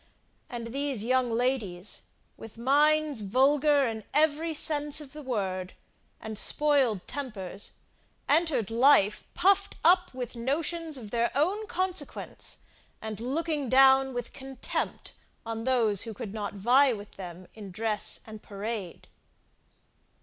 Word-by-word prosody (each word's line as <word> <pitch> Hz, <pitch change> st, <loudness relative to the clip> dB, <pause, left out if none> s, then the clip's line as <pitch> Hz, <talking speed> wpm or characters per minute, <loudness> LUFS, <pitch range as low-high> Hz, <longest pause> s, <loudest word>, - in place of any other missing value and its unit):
And 235 Hz, -2 st, -6 dB
these 275 Hz, -5 st, -1 dB
young 255 Hz, +1 st, +2 dB
ladies, 225 Hz, -6 st, -1 dB, 0.3 s
with 225 Hz, 0 st, -12 dB
minds 295 Hz, +1 st, +3 dB
vulgar 280 Hz, +6 st, +3 dB
in 220 Hz, -1 st, -4 dB
every 310 Hz, +2 st, +2 dB
sense 295 Hz, -1 st, +1 dB
of 285 Hz, -3 st, -8 dB
the 300 Hz, -, -8 dB
word, 190 Hz, -8 st, -3 dB, 0.5 s
and 220 Hz, -1 st, -4 dB
spoiled 275 Hz, -10 st, +2 dB
tempers, 215 Hz, -9 st, -5 dB, 0.5 s
entered 290 Hz, -, +2 dB
life 230 Hz, -4 st, +4 dB
puffed 390 Hz, +2 st, +3 dB
up 360 Hz, +2 st, +5 dB
with 250 Hz, -2 st, -6 dB
notions 310 Hz, +5 st, 0 dB
of 215 Hz, -5 st, -9 dB
their 235 Hz, 0 st, +1 dB
own 385 Hz, +10 st, +1 dB
consequence, 370 Hz, 0 st, -3 dB, 0.4 s
and 220 Hz, -2 st, -6 dB
looking 290 Hz, +2 st, -2 dB
down 265 Hz, +1 st, +6 dB
with 245 Hz, -1 st, -5 dB
contempt 265 Hz, -1 st, -4 dB, 0.3 s
on 225 Hz, 0 st, -4 dB
those 230 Hz, -6 st, +2 dB
who 225 Hz, -2 st, -5 dB
could 200 Hz, 0 st, -6 dB
not 205 Hz, -2 st, -4 dB
vie 250 Hz, +7 st, +4 dB
with 205 Hz, -1 st, -9 dB
them 180 Hz, -1 st, -9 dB
in 210 Hz, -3 st, -9 dB
dress 215 Hz, +2 st, -1 dB
and 215 Hz, -1 st, -10 dB
parade. 205 Hz, -3 st, -6 dB
255 Hz, 130 wpm, -28 LUFS, 220-290 Hz, 0.5 s, down